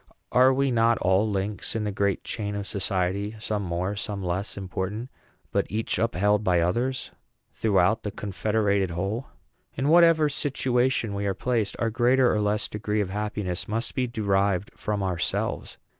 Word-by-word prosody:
Are 130 Hz, +1 st, +6 dB
we 135 Hz, 0 st, +1 dB
not 115 Hz, -1 st, +3 dB
all 95 Hz, +4 st, +2 dB
links 100 Hz, +2 st, -2 dB
in 110 Hz, -, -1 dB
the 105 Hz, -, -1 dB
great 100 Hz, -1 st, 0 dB
chain 105 Hz, -3 st, -4 dB
of 100 Hz, -1 st, -3 dB
society, 100 Hz, +1 st, -1 dB
some 105 Hz, -1 st, -2 dB
more, 90 Hz, +2 st, -2 dB
some 100 Hz, -1 st, -4 dB
less 95 Hz, +4 st, -2 dB
important, 100 Hz, +5 st, -4 dB, 0.4 s
but -, -, +1 dB
each 110 Hz, +3 st, -1 dB
upheld 105 Hz, -1 st, +2 dB
by 90 Hz, -3 st, +3 dB
others, 120 Hz, +10 st, -1 dB, 0.4 s
throughout 100 Hz, 0 st, +2 dB
the 105 Hz, -, -3 dB
confederated 100 Hz, 0 st, 0 dB
whole? 100 Hz, +9 st, -3 dB, 0.5 s
In 135 Hz, +2 st, 0 dB
whatever 165 Hz, -2 st, +6 dB
situation 130 Hz, -5 st, 0 dB
we 100 Hz, 0 st, -2 dB
are 95 Hz, -, 0 dB
placed, 115 Hz, -5 st, -1 dB
our 115 Hz, -1 st, 0 dB
greater 125 Hz, +2 st, +3 dB
or 105 Hz, -, +1 dB
less 105 Hz, +1 st, +1 dB
degree 105 Hz, 0 st, -2 dB
of 95 Hz, -2 st, -3 dB
happiness 105 Hz, -3 st, -3 dB
must 115 Hz, +2 st, -2 dB
be 130 Hz, -1 st, 0 dB
derived 100 Hz, -4 st, 0 dB
from 105 Hz, -2 st, -2 dB
ourselves. 90 Hz, -3 st, -2 dB
105 Hz, 160 wpm, -26 LUFS, 95-115 Hz, 0.5 s, Are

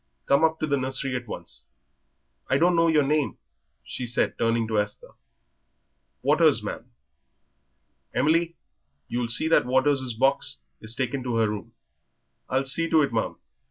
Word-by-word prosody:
Come 140 Hz, +3 st, +3 dB
up 160 Hz, 0 st, +2 dB
to -, -, 0 dB
the 140 Hz, -2 st, 0 dB
nursery 135 Hz, 0 st, -1 dB
at 125 Hz, -1 st, -5 dB
once. -, -, -7 dB, 0.8 s
I 135 Hz, -, +3 dB
don't 175 Hz, +3 st, +3 dB
know 165 Hz, 0 st, +4 dB
your 155 Hz, -3 st, +4 dB
name," 150 Hz, 0 st, 0 dB, 0.5 s
she 125 Hz, -, -5 dB
said, 120 Hz, -, +1 dB
turning 115 Hz, 0 st, +1 dB
to 110 Hz, -1 st, +1 dB
Esther. 105 Hz, 0 st, -4 dB, 1.1 s
"Waters, -, -, +4 dB
ma'am." -, -, -6 dB, 1.2 s
"Emily, 165 Hz, +3 st, +1 dB, 0.5 s
you'll 120 Hz, 0 st, -2 dB
see 120 Hz, +7 st, +3 dB
that 165 Hz, -, +3 dB
Waters' 130 Hz, -1 st, +1 dB
box 130 Hz, -, +1 dB, 0.2 s
is 110 Hz, +2 st, -4 dB
taken 130 Hz, +1 st, -2 dB
to 125 Hz, -2 st, -3 dB
her 115 Hz, -1 st, +3 dB
room." 105 Hz, -1 st, -6 dB, 0.8 s
"I'll 135 Hz, +1 st, 0 dB
see 165 Hz, +5 st, +1 dB
to 160 Hz, -2 st, +4 dB
it, 135 Hz, -, -2 dB
ma'am." 110 Hz, -, -1 dB
130 Hz, 155 wpm, -25 LUFS, 120-150 Hz, 1.2 s, know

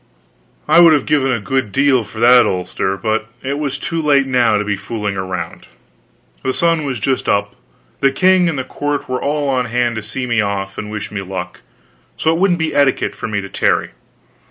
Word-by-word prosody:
I -, -, +6 dB
would 170 Hz, -2 st, +8 dB
have 145 Hz, -, +1 dB
given 135 Hz, -3 st, +1 dB
a 120 Hz, -, 0 dB
good 130 Hz, -1 st, -2 dB
deal 135 Hz, -1 st, +3 dB
for 110 Hz, +1 st, -11 dB
that 125 Hz, +1 st, +6 dB
ulster, 95 Hz, +1 st, -2 dB
but 110 Hz, +1 st, -1 dB, 0.2 s
it 140 Hz, +2 st, -2 dB
was 140 Hz, -2 st, -2 dB
too 165 Hz, +2 st, -3 dB
late 140 Hz, -3 st, +3 dB
now 125 Hz, -5 st, +2 dB
to 105 Hz, -, -1 dB
be 105 Hz, -1 st, -1 dB
fooling 105 Hz, 0 st, -4 dB
around. 90 Hz, -3 st, -5 dB, 0.7 s
The 130 Hz, -, -2 dB
sun 165 Hz, -2 st, +1 dB
was 130 Hz, -4 st, -3 dB
just 130 Hz, +5 st, -1 dB
up, 100 Hz, 0 st, 0 dB, 0.4 s
the 135 Hz, -, +3 dB
king 185 Hz, +4 st, +3 dB
and 155 Hz, -, -3 dB
the 130 Hz, -, -2 dB
court 145 Hz, +2 st, -3 dB
were 130 Hz, 0 st, -2 dB
all 145 Hz, 0 st, -1 dB
on 130 Hz, -2 st, +1 dB
hand 120 Hz, 0 st, 0 dB
to -, -, -3 dB
see 110 Hz, +5 st, -5 dB
me 120 Hz, -2 st, +1 dB
off 100 Hz, -1 st, -3 dB
and 105 Hz, -, -6 dB
wish 105 Hz, -1 st, -6 dB
me 105 Hz, -2 st, -4 dB
luck; 90 Hz, -2 st, -6 dB, 0.6 s
so 160 Hz, -, +1 dB
it 165 Hz, -, -1 dB
wouldn't 185 Hz, -2 st, +3 dB
be 160 Hz, -1 st, -2 dB
etiquette 140 Hz, -2 st, +2 dB
for 115 Hz, -, -6 dB
me 105 Hz, -2 st, -2 dB
to 100 Hz, -, -8 dB
tarry. -, -, 0 dB
125 Hz, 210 wpm, -17 LUFS, 105-145 Hz, 0.7 s, would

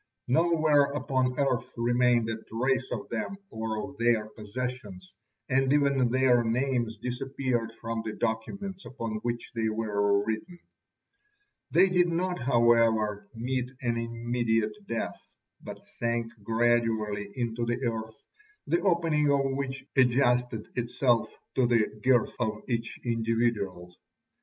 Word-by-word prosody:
Nowhere 155 Hz, 0 st, +4 dB
upon 130 Hz, -3 st, 0 dB
earth 135 Hz, -4 st, 0 dB
remained 120 Hz, -1 st, +3 dB
a 110 Hz, 0 st, -3 dB
trace 130 Hz, +3 st, 0 dB
of 110 Hz, -4 st, -4 dB
them 115 Hz, -, -3 dB
or 110 Hz, -1 st, -3 dB
of 140 Hz, 0 st, -14 dB
their 115 Hz, -2 st, +2 dB
possessions, 105 Hz, -4 st, -6 dB, 0.3 s
and 135 Hz, 0 st, +2 dB
even 140 Hz, -4 st, +3 dB
their 125 Hz, -1 st, +4 dB
names 120 Hz, -1 st, 0 dB
disappeared 125 Hz, 0 st, -2 dB
from 115 Hz, 0 st, -3 dB
the 110 Hz, -1 st, -4 dB
documents 190 Hz, -, -3 dB
upon 115 Hz, -4 st, -5 dB
which 120 Hz, +2 st, -4 dB
they 110 Hz, -1 st, 0 dB
were 100 Hz, -2 st, +1 dB
written. 115 Hz, -, -4 dB, 1.1 s
They 190 Hz, -, +5 dB
did 180 Hz, -1 st, +3 dB
not, 180 Hz, +1 st, -1 dB
however, 115 Hz, -4 st, +3 dB
meet 125 Hz, +2 st, -2 dB
an 120 Hz, -2 st, 0 dB
immediate 115 Hz, -, -1 dB
death, 115 Hz, -, -3 dB, 0.4 s
but -, -, -9 dB
sank 115 Hz, -1 st, -1 dB
gradually 110 Hz, -2 st, +1 dB
into 120 Hz, -1 st, -2 dB
the 120 Hz, +2 st, -1 dB
earth, 110 Hz, 0 st, -3 dB, 0.5 s
the 170 Hz, -, +1 dB
opening 165 Hz, -5 st, +2 dB
of 140 Hz, -1 st, +4 dB
which 135 Hz, -1 st, -4 dB
adjusted 125 Hz, -3 st, +2 dB
itself 120 Hz, 0 st, +1 dB, 0.2 s
to 130 Hz, -2 st, +3 dB
the 115 Hz, -3 st, +3 dB
girth 130 Hz, -3 st, +3 dB
of 110 Hz, -2 st, -2 dB
each 115 Hz, -2 st, -3 dB
individual. 115 Hz, -6 st, -1 dB
120 Hz, 125 wpm, -28 LUFS, 110-130 Hz, 1.1 s, They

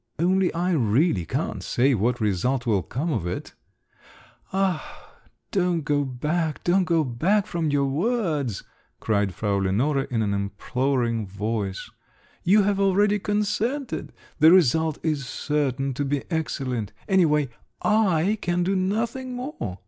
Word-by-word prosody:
"Only 185 Hz, +3 st, +2 dB
I 175 Hz, +2 st, 0 dB
really 115 Hz, -, +2 dB
can't -, -, -2 dB
say 135 Hz, +3 st, +2 dB
what 120 Hz, +2 st, +1 dB
result 115 Hz, +5 st, 0 dB
will 105 Hz, -5 st, +2 dB
come 145 Hz, -, -3 dB
of 90 Hz, -8 st, -2 dB
it 90 Hz, -, -5 dB, 0.5 s
…" -, -, -26 dB
"Ah, 195 Hz, -, -2 dB, 0.4 s
don't 180 Hz, -4 st, +1 dB
go 145 Hz, 0 st, +1 dB
back, 150 Hz, +5 st, -2 dB
don't 180 Hz, +1 st, +3 dB
go 165 Hz, -3 st, +2 dB
back 175 Hz, -, +1 dB
from 165 Hz, -3 st, -2 dB
your 145 Hz, -1 st, +2 dB
words!" 150 Hz, -, -1 dB, 0.4 s
cried 100 Hz, -3 st, 0 dB
Frau 105 Hz, -1 st, 0 dB
Lenore 125 Hz, +9 st, +1 dB
in 115 Hz, -3 st, -1 dB
an 100 Hz, -1 st, 0 dB
imploring 115 Hz, +3 st, -1 dB
voice; 100 Hz, 0 st, -3 dB, 0.5 s
"you 200 Hz, +4 st, +4 dB
have 200 Hz, 0 st, +1 dB
already 200 Hz, +1 st, +3 dB
consented! 215 Hz, +7 st, -1 dB, 0.3 s
The 160 Hz, +1 st, +8 dB
result 160 Hz, -2 st, +4 dB
is 150 Hz, -5 st, -1 dB
certain 140 Hz, -2 st, -1 dB
to 145 Hz, -, -2 dB
be 140 Hz, 0 st, -1 dB
excellent. 130 Hz, -9 st, -2 dB
Any 190 Hz, -3 st, +4 dB
way, 150 Hz, -3 st, +1 dB, 0.3 s
I 210 Hz, -2 st, +2 dB
can 175 Hz, -1 st, 0 dB
do 195 Hz, +2 st, 0 dB
nothing 230 Hz, +7 st, -1 dB
more! 245 Hz, -, -5 dB
150 Hz, 140 wpm, -24 LUFS, 120-190 Hz, 0.5 s, The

